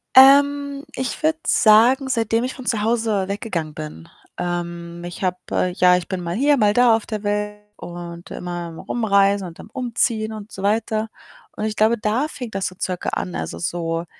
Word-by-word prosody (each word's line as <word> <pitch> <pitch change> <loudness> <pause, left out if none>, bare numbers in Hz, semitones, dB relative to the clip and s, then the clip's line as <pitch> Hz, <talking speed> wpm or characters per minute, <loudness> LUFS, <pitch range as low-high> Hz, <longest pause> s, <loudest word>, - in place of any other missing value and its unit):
Ähm, 280 +1 +6
ich 260 +3 -4
würde 315 0 +2
sagen, 245 +5 +5
seitdem 230 -2 +1
ich 255 - -3
von 255 -2 -10
zu 220 -4 +1
Hause 220 -4 +1
weggegangen 190 -6 -3
bin. 150 - -8 0.3
Ähm, 170 -1 -4
ich 175 +2 -7
habe 180 0 -1
ja, 180 0 +5
ich 180 - -5
bin 185 -2 -3
mal 170 +1 -3
hier, 285 +4 +3
mal 210 -3 +3
da 245 -1 +5
auf 225 - -4
der 215 -2 -4
Welt 210 0 -2 0.2
und 175 0 -8
immer 180 0 -6 0.2
am 165 -1 -10
Rumreisen 200 -4 +2
und 170 - -11
dann - - -10
am - - -25
Umziehen 230 -3 0
und 215 0 -9
so 195 - -8
weiter 215 +1 0 0.5
und 215 - -3
ich 215 - -2
glaube, 220 +3 +3
da 220 +7 0
fing 250 -7 -7
das 195 -1 -1
so 185 - -8
circa 180 -1 -2
an. 85 -1 -3
Also, 80 0 -4
so 165 - -2
210 Hz, 195 wpm, -21 LUFS, 175-235 Hz, 0.5 s, Ähm